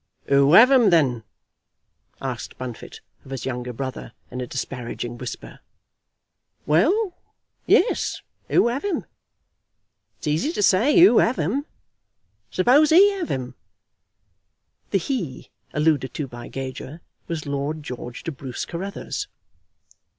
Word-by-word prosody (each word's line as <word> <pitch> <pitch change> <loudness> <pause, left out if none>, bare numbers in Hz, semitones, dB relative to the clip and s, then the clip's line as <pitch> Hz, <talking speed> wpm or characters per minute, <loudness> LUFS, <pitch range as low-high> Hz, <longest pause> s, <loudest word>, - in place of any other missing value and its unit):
"Who 140 +2 +5
have 245 +8 +9
'em, 245 -6 +6
then?" 135 - +2 1.0
asked - - -5
Bunfit 125 -3 -8 0.2
of - - -15
his 135 -2 -5
younger 125 -1 -4
brother, 130 -1 -6 0.2
in 125 - -5
a 125 - -4
disparaging 120 -2 -5
whisper. 125 - -7 1.1
"Well; 360 - +2 0.5
yes; - - +2 0.3
who - - +4
'ave 275 +12 -1
'em? 350 - -2 1.1
It's - - -10
easy 155 - 0
to 210 - -1
say, 235 - +4
who 340 -10 +7
'ave 235 -4 +1
'em? 270 - -2 0.8
Suppose 275 +11 +4
'e 395 +4 +6
'ave 335 - -3
'em." 130 -2 -3 1.4
The - - +2
"he" 190 - -4 0.2
alluded 150 -5 +1
to 150 - -2
by 120 -1 -9
Gager 135 +4 -7 0.3
was 165 -3 -4
Lord 145 +2 -3
George 125 -2 -7
de 165 - -3
Bruce 130 -3 -6
Carruthers. 190 +4 -5
150 Hz, 125 wpm, -23 LUFS, -, 1.4 s, have